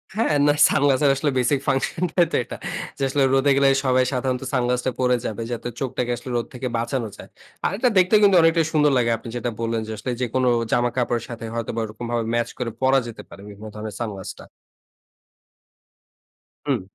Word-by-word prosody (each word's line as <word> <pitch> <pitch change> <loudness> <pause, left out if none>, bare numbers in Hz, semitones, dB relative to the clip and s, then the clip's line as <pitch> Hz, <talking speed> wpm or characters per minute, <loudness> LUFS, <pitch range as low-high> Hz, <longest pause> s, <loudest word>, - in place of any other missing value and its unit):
হ্যাঁ, 220 -7 +1
না 145 - +5
সানগ্লাসের 140 0 +3
আসলে 145 +1 0
বেসিক 130 +3 +2
ফাংশনটাই 165 +6 +1
তো - - -1
এটা। - - -8 0.4
যে 135 - -3
আসলে 140 +1 +2
রোদে 135 +1 +3
গেলে 140 0 +4 0.2
সবাই 130 0 +3
সাধারণত 125 0 -1
সানগ্লাসটা 125 0 0
পরে 125 -1 +3
যাবে, 110 +1 -4
যাতে 120 0 -4
চোখটাকে 125 -2 -2
আসলে 125 - -9
রোদ 120 - -2
থেকে 125 +1 -4
বাঁচানো 120 +1 -2
যায়। - - -12 0.4
আর - - +2
এটা 250 +3 +3
দেখতে 185 +3 +5
কিন্তু 200 -2 +6
অনেকটাই 165 0 +3
সুন্দর 150 -1 +4
লাগে। 120 -1 +2
আপনি 115 - -10
যেটা 120 0 -2
বললেন 115 -1 -1
যে, - - -5
"আসলে 115 +5 -4
যেকোনো 125 +1 0 0.2
জামা-কাপড়ের 120 -1 0
সাথে 115 -1 -7
হয়তোবা 115 0 -3
ওরকমভাবে 115 +2 -3
ম্যাচ 120 0 0
করে 120 -2 -3
পরা 135 +1 +4
যেতে 115 - -8
পারে - - -12
বিভিন্ন 105 +2 -10
ধরনের 105 0 -6
সানগ্লাসটা।" 100 -5 -6 2.2
হুম। 135 -8 0
125 Hz, 175 wpm, -23 LUFS, 115-140 Hz, 2.2 s, কিন্তু